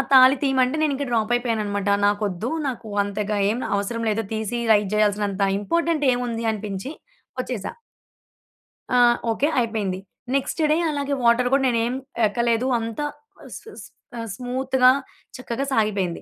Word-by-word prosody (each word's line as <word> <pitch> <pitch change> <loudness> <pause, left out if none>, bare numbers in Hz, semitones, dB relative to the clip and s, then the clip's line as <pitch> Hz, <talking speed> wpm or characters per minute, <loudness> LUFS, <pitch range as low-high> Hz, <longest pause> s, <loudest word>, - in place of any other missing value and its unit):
తాళి 260 +1 +8
తీయమంటే 265 0 +2
నేను 300 -2 +2
ఇంకా 280 0 -3
డ్రాప్ 225 0 +1
అయిపోయానన్నమాట. 210 -4 -1 0.2
నాకు 205 +1 +1
ఒద్దు. 190 +6 -4 0.2
నాకు 230 -3 -6
అంతగా 205 +1 -2
ఏమి 235 +4 -2
అవసరం 230 +3 -2
లేదు 220 +1 0
తీసి 220 +2 -2
రైడ్ 205 -2 +3
చేయాల్సినంత 205 -1 +1 0.2
ఇంపార్టెంట్ 330 +5 0
ఏముంది 240 -2 -2
అనిపించి 205 +3 -5 0.5
వచ్చేసా. 240 -6 -4 1.2
ఆ! - - +4 0.3
ఓకే 275 +6 +1
అయిపోయింది. 210 -5 -1 0.4
నెక్స్ట్ 275 +4 -1
డే 310 - +3
అలాగే 285 -1 -2
వాటర్ 240 +1 +4
కూడా 275 -1 +3
నేనేం 235 0 +1 0.3
ఎక్కలేదు. 235 +3 0
అంత 225 +1 -5 0.4
సుస్ - - -10
సుస్ 445 - -11 0.3
ఆహ్, 230 0 -5
స్మూత్‌గా 255 0 +2 0.5
చక్కగా 255 +2 -3
సాగిపోయింది. 200 -6 0
230 Hz, 135 wpm, -23 LUFS, 210-255 Hz, 1.2 s, తాళి